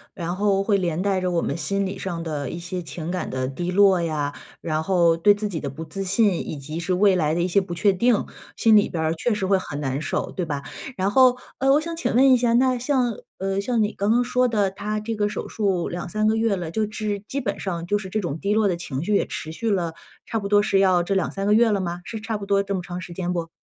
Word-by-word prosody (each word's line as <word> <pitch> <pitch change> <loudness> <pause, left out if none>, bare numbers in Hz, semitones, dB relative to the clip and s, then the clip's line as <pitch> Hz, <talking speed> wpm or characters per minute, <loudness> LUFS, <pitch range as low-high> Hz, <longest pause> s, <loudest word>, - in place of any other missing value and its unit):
然 175 0 -3
后 200 0 +2
会 200 -1 +2
连 170 -2 -1
带 195 -2 +1
着 185 - 0
我 170 -2 0
们 - - -1
心 195 +5 -1
理 190 0 -5
上 170 -3 -4
的 150 -3 -3
一 - - -5
些 175 +1 -5
情 165 0 -6
感 185 - -3
的 130 0 -2
低 175 +7 -4
落 190 -1 +5
呀， 150 -3 -2 0.3
然 155 -1 -1
后 170 -1 +3
对 205 +5 +4
自 210 +1 -2
己 175 -6 -4
的 140 - -4
不 155 +5 -7
自 195 +4 -4
信， 200 +1 +3 0.2
以 155 - -4
及 155 +4 -6
是 180 +2 -1
未 195 0 +4
来 155 -3 +1
的 170 - 0
一 - - +1
些 195 +2 +3
不 175 -2 -6
确 195 +4 +3
定， 235 +3 +2 0.3
心 225 -1 +5
里 205 - +5
边 160 -2 -2
儿 160 - +1
确 200 +9 -1
实 210 -2 -1
会 190 0 +3
很 145 -5 -6
难 135 -1 -2
受， - - -2
对 180 - -3
吧？ 145 -3 -4 0.3
然 195 +2 +1
后， 255 +1 +5 0.2
呃， 270 +1 +3
我 290 - +5
想 335 +2 -5
请 330 - -1
问 265 +1 +6
一 - - +7
下， 240 -1 +2
那 255 +1 +3
像， 250 -3 +1 0.2
呃， 195 +1 -1
像 230 0 +1
你 210 - -1
刚 200 +2 -1
刚 240 +2 +4
说 250 +1 +2
的， 205 -5 +1
他 210 +2 -3
这 225 +1 -4
个 205 0 0
手 - - -5
术 195 -5 -1
2-3 180 +5 -2
个 215 +1 +3
月 225 -2 +1
了， 170 -3 -5
就是 215 0 -2
基 280 - -3
本 245 - -3
上 170 -3 -3
就 205 +4 0
是 190 -2 -7
这 215 - -1
种 165 -5 -3
低 205 +2 0
落 220 -2 +3
的 185 - +1
情 150 -5 -5
绪 210 - -1
也 200 - +2
持 155 - -6
续 225 +8 -3
了 175 -5 0 0.3
差 225 - -2
不 200 - -4
多 205 0 +4
是 195 -2 +2
要 185 -2 +4
这 195 - -1
2-3 195 +1 -1
个 205 - +3
月 230 +1 +5
了 205 -2 +1
吗？ 175 -1 -4
是 225 - -5
差 220 -1 -3
不 200 - -7
多 200 0 +3
这 200 0 -3
么 185 - -1
长 180 0 -6
时 175 -1 -8
间 180 0 -3
不？ 165 -2 -3
195 Hz, 295 characters per minute, -23 LUFS, 170-215 Hz, 0.3 s, 一